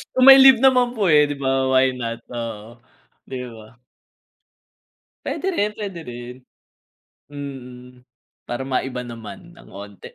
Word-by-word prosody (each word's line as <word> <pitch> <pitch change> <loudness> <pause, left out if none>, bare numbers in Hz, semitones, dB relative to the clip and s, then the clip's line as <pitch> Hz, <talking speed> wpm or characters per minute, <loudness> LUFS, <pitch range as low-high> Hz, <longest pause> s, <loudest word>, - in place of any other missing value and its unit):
Kung 260 +1 +8
may 270 - +9
leave 265 -2 +7
naman 250 -2 +3
po, 200 -6 +1
eh, 150 -1 +5
'di 145 - -4
ba? 135 -1 -1
Why 130 0 +4
not, 115 -2 -6
oo. 115 -1 -7 0.5
'Di 125 -2 -7
ba? 110 0 -15 1.5
Puwede 385 - -3
rin, 210 - -1
puwede 195 -5 -7
rin. 120 0 -9 1.0
Mm, 125 -3 -10 0.4
para 120 +1 -5
maiba 130 -1 -3
naman 120 - -11
ng - - -17
onti. 100 0 -11
130 Hz, 135 wpm, -21 LUFS, 120-175 Hz, 1.5 s, may